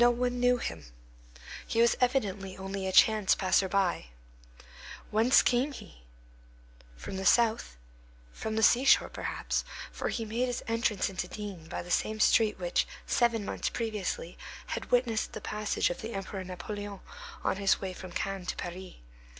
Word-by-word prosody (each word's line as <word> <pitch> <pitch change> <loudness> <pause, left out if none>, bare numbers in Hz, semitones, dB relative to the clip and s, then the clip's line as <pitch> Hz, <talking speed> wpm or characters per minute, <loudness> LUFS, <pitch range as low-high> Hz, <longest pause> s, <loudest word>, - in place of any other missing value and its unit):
No 240 - +7
one 245 +1 0
knew 245 0 +4
him. 80 - -5 0.8
He 225 - -1
was 235 0 +5
evidently 205 -7 0
only 195 0 -4
a - - -1
chance 215 0 +5
passer 190 0 +2
by. 185 - 0 1.0
Whence 225 +4 +5
came 260 +4 +2
he? 65 - -12 1.0
From 190 - -6
the 190 - -3
south; 220 - +3 0.6
from 220 0 -4
the 220 - +1
seashore, 255 +5 +5
perhaps, - - -2 0.3
for - - -3
he 230 - -3
made 235 +4 -1
his 245 - -3
entrance 230 -3 +1
into 185 -2 -4
D—— 195 -5 -7
by - - -4
the 175 - -9
same 215 +3 0
street 215 0 +4
which, - - 0 0.2
seven 235 -3 +1
months - - -2
previously, 210 -6 -3 0.3
had - - -5
witnessed 240 -3 +1
the - - -5
passage 210 -3 -1
of - - -6
the 225 +2 -5
Emperor 195 0 -5
Napoleon 200 +2 -6 0.4
on - - 0
his 195 -1 +3
way 190 -1 -4
from 185 0 -9
Cannes 195 0 -3
to - - -2
Paris. 180 +1 -7
210 Hz, 160 wpm, -30 LUFS, 190-235 Hz, 1.0 s, No